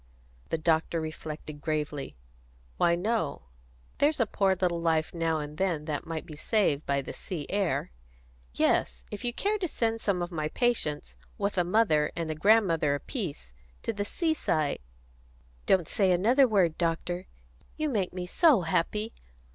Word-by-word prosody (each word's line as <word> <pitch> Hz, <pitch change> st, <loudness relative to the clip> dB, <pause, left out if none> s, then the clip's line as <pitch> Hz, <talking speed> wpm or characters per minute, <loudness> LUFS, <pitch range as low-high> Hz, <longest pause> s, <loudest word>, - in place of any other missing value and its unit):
The -, -, 0 dB
doctor 160 Hz, +1 st, +1 dB
reflected 155 Hz, -1 st, -6 dB
gravely. 150 Hz, -2 st, -2 dB, 0.6 s
"Why, 170 Hz, 0 st, +4 dB
no. 200 Hz, -3 st, -1 dB, 0.6 s
There's 295 Hz, +1 st, +3 dB
a 230 Hz, -, +4 dB
poor 195 Hz, -2 st, +2 dB
little 175 Hz, -2 st, +1 dB
life 160 Hz, -1 st, +1 dB
now 165 Hz, -2 st, 0 dB
and 150 Hz, 0 st, -6 dB
then 170 Hz, -6 st, 0 dB
that 150 Hz, -1 st, -3 dB
might 165 Hz, -1 st, -4 dB
be 155 Hz, -, -9 dB
saved 155 Hz, -4 st, +1 dB
by 140 Hz, 0 st, +1 dB
the -, -, -6 dB
sea 160 Hz, -6 st, -5 dB
air. 195 Hz, -, 0 dB, 0.6 s
Yes, 60 Hz, 0 st, +1 dB
if -, -, -6 dB
you 240 Hz, -, +1 dB
care 410 Hz, -, 0 dB
to 365 Hz, -, -1 dB
send 225 Hz, -6 st, -1 dB
some 185 Hz, -4 st, 0 dB
of 175 Hz, -, -5 dB
my 155 Hz, -3 st, -2 dB
patients, 150 Hz, -, -1 dB, 0.2 s
with 200 Hz, -, -1 dB
a 180 Hz, -, +3 dB
mother 175 Hz, -6 st, +3 dB
and 165 Hz, -2 st, -2 dB
a -, -, 0 dB
grandmother 165 Hz, -5 st, +3 dB
apiece, 145 Hz, -, -4 dB, 0.3 s
to 230 Hz, -, -1 dB
the 205 Hz, -1 st, -2 dB
seaside 205 Hz, -, 0 dB, 0.4 s
" -, -, -31 dB
"Don't 180 Hz, -5 st, +3 dB
say 195 Hz, -3 st, +2 dB
another 235 Hz, +10 st, +5 dB
word, 185 Hz, -8 st, +2 dB
doctor," 170 Hz, +1 st, 0 dB
cried 175 Hz, -, -4 dB
Annie. 60 Hz, -, -24 dB
"You 310 Hz, -1 st, 0 dB
make 205 Hz, -8 st, 0 dB
me 180 Hz, 0 st, -4 dB
so 275 Hz, -, +4 dB
happy! 210 Hz, +6 st, 0 dB
170 Hz, 170 wpm, -29 LUFS, 150-205 Hz, 0.6 s, another